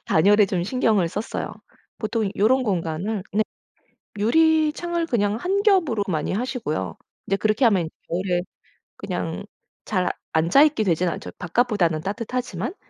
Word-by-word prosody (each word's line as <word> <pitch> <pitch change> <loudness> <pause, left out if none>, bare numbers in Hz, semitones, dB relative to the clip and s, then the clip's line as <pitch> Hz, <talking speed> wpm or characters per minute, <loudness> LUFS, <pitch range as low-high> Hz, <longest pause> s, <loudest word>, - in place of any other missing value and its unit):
단열에 205 +5 +5
좀 180 -2 -1
신경을 215 -6 +2
썼어요. 205 +6 -4 0.5
보통 215 -2 -1
요런 255 +6 +3
공간을 185 +2 -2
네 215 +2 +3 0.8
유리창을 320 +7 +2
그냥 205 -6 +1
1 385 - 0
겹으로 345 - +3
많이 155 -5 -1
하시고요. 220 - -3 0.3
근데 195 - 0
그렇게 215 +4 +1
하면 190 -7 +2 0.2
겨울에 175 0 0 0.6
그냥 - - -4 0.4
잘 185 -4 0 0.2
앉아 165 - +4
있게 300 -8 +2
되진 180 -2 +1
않죠. - - -6
바깥보다는 180 -4 +1
따뜻하지만 230 - -3
210 Hz, 300 characters per minute, -23 LUFS, 180-250 Hz, 0.8 s, 단열에